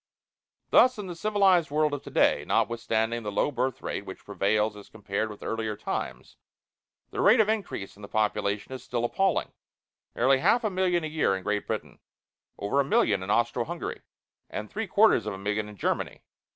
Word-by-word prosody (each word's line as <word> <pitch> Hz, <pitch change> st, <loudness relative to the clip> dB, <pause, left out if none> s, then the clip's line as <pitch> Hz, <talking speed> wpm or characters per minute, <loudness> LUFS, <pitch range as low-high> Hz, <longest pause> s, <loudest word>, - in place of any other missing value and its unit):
Thus 255 Hz, -1 st, +6 dB
in 205 Hz, -, -5 dB
the 180 Hz, -, -5 dB
civilized 190 Hz, -2 st, +3 dB
world 150 Hz, 0 st, +1 dB
of 145 Hz, -, -3 dB
today, -, -, +2 dB
notwithstanding 115 Hz, 0 st, 0 dB
the 105 Hz, -2 st, -4 dB
low 100 Hz, -, +1 dB
birth 130 Hz, -1 st, -2 dB
rate -, -, -3 dB
which -, -, -10 dB
prevails 105 Hz, +2 st, +1 dB
as 105 Hz, -, -12 dB
compared 105 Hz, 0 st, -3 dB
with 105 Hz, -, -10 dB
earlier 110 Hz, -2 st, -3 dB
times, -, -, -5 dB, 0.7 s
the -, -, -2 dB
rate 220 Hz, +4 st, +6 dB
of 220 Hz, -, +5 dB
increase 200 Hz, -, -3 dB
in 100 Hz, -, -16 dB
the 100 Hz, -, -8 dB
population 105 Hz, 0 st, -1 dB
is 130 Hz, -2 st, -7 dB
still 120 Hz, -2 st, -2 dB
appalling 190 Hz, +8 st, 0 dB, 0.6 s
nearly 130 Hz, +2 st, +4 dB
half 235 Hz, -, +3 dB
a 215 Hz, -, 0 dB
million 180 Hz, -2 st, +1 dB
a -, -, -2 dB
year 155 Hz, -10 st, +1 dB
in 95 Hz, -, -9 dB
Great 105 Hz, +1 st, -1 dB
Britain, -, -, -4 dB, 0.6 s
over 105 Hz, +8 st, 0 dB
a -, -, +5 dB
million 105 Hz, -7 st, +2 dB
in 95 Hz, -, -6 dB
Austro 120 Hz, +2 st, +2 dB
Hungary, 170 Hz, +6 st, -5 dB, 0.5 s
and 105 Hz, 0 st, -6 dB
three 220 Hz, +1 st, -3 dB
quarters 200 Hz, -, +4 dB
of 105 Hz, -, -3 dB
a -, -, -8 dB
million 105 Hz, +2 st, -2 dB
in 105 Hz, -, -11 dB
Germany. -, -, -2 dB
120 Hz, 190 wpm, -27 LUFS, 105-175 Hz, 0.7 s, Thus